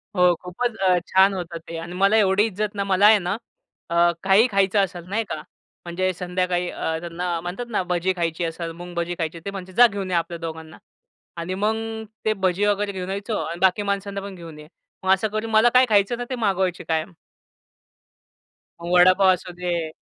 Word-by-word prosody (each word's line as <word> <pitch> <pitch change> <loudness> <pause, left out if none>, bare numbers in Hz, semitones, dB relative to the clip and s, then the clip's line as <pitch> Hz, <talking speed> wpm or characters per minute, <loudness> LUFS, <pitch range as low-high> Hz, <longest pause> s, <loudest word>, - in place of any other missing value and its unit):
हो. 180 -1 +5
खूपच 220 +6 -3
अ, 185 -2 +3
छान 190 +1 +4
होतं 175 -2 -5
ते. 165 - -6
आणि 170 +2 -7
मला 200 +3 +3
एवढी 200 0 +4
इज्जत 210 0 -3
ना, 200 - -1
मला 195 +1 +3
आहे 215 -1 +7
ना 180 +4 -2 0.5
अ, 170 0 +4
काही 200 +5 +5
खायचं 195 +1 +2
असेल 180 -3 -5
नाही 225 +3 0
का - - -2 0.5
म्हणजे 185 +2 -1
संध्याकाळी 180 0 -1
अ, 160 0 -3
त्यांना 175 0 -3
म्हणतात 180 +8 -5
ना 205 - 0
भजी 180 +1 0
खायची 170 0 -2
असेल, 165 0 -4
मुंग 175 +1 -10
भजी 170 +1 -2
खायची 165 +1 -3
ते 200 - -3
म्हणतात 185 -1 -8
"जा 245 0 +9
घेऊन 200 -3 -5
या 175 - +2
आपल्या 170 0 -2
दोघांना." 160 -1 -7 0.6
आणि 170 +2 -4
मग 210 +3 0 0.5
ते 215 - +3
भजी 185 +3 +2
वगैरे 205 0 +1
घेऊन 185 -1 -5
यायचो. 205 +2 -3
"आणि 170 +1 -5
बाकी 190 +2 +3
माणसांना 200 0 -3
पण 200 -1 -8
घेऊन 165 -3 -11
ये." 150 - -12 0.4
मग 190 - +2
असं 195 +3 0
करून 215 +1 -4
मला 220 +2 +5
काय 255 +1 +6
खायचं 205 +2 +3
ना 245 - -4
ते 255 - -2
मागवायचे 190 -5 0
कायम. 160 +2 -1 1.7
मग 170 +1 -5
वडापाव 185 +2 +6
असुदे 175 -2 -3
185 Hz, 195 wpm, -23 LUFS, 175-200 Hz, 1.7 s, जा